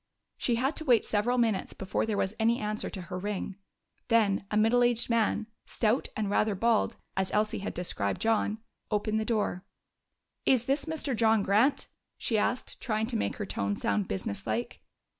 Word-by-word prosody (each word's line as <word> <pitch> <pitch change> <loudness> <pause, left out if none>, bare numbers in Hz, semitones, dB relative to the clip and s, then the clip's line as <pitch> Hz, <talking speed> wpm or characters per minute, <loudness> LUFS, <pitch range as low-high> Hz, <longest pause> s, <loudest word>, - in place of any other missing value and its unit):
She 240 - +1
had 265 +6 0
to - - -2
wait 245 -7 +4
several 220 +4 +1
minutes 225 -5 +1
before 190 +3 -2
there 215 -2 -1
was 190 +1 0
any 230 +2 +3
answer 215 0 -2
to 190 - -6
her 180 +1 -5
ring. 200 0 -4 0.5
Then 210 -4 +2
a 210 - 0
middle 225 +3 +4
aged 240 0 +2
man, 220 -1 +2 0.2
stout 225 +3 +1
and 215 -1 0
rather 205 +1 +2
bald, 230 +2 +2 0.2
as 190 -1 +1
Elsie 215 +1 +1
had 200 - -5
described 100 - -1
John, 220 -1 +1 0.3
opened 215 0 0
the 220 - -2
door. 210 -5 -1 0.8
"Is 250 -3 +3
this 275 +2 0
Mr. 315 -5 -2
John 220 -2 +3
Grant?" 220 +9 +3 0.3
she 230 - -1
asked, 245 +4 -2
trying 220 -3 0
to 235 +1 -3
make 220 - -1
her 210 - -4
tone 100 - -2
sound 100 -1 0
business 100 +2 -4
like. 110 +2 -2
215 Hz, 180 wpm, -29 LUFS, 200-235 Hz, 0.8 s, wait